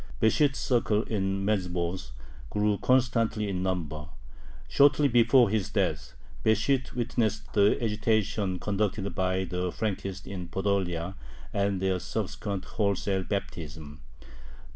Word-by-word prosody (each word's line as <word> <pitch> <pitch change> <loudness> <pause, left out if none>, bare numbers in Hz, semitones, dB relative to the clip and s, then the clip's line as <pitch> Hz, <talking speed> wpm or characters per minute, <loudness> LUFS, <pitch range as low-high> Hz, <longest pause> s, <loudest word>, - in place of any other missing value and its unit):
Besht's 135 +5 +3
circle 115 -4 +1
in 95 -2 -1
Medzhibozh 90 -6 -1 0.4
grew 105 -1 +1
constantly 115 -4 +2
in 95 -2 -2
number. 80 -5 -3 0.6
Shortly 145 +1 +5
before 120 -2 +5
his 110 -3 0
death, - - -1 0.3
Besht 115 +5 +1
witnessed 110 -3 -1
the 100 0 +4
agitation 105 -3 0
conducted 100 0 -1
by 95 0 0
the 90 0 -2
Frankists 95 -3 -3
in 90 -3 -6
Podolia 95 -2 -1 0.4
and 100 -1 +1
their 95 -1 0
subsequent 100 +2 -4
wholesale 100 -2 0
baptism. 75 -7 -5
100 Hz, 110 wpm, -28 LUFS, 95-110 Hz, 0.6 s, Shortly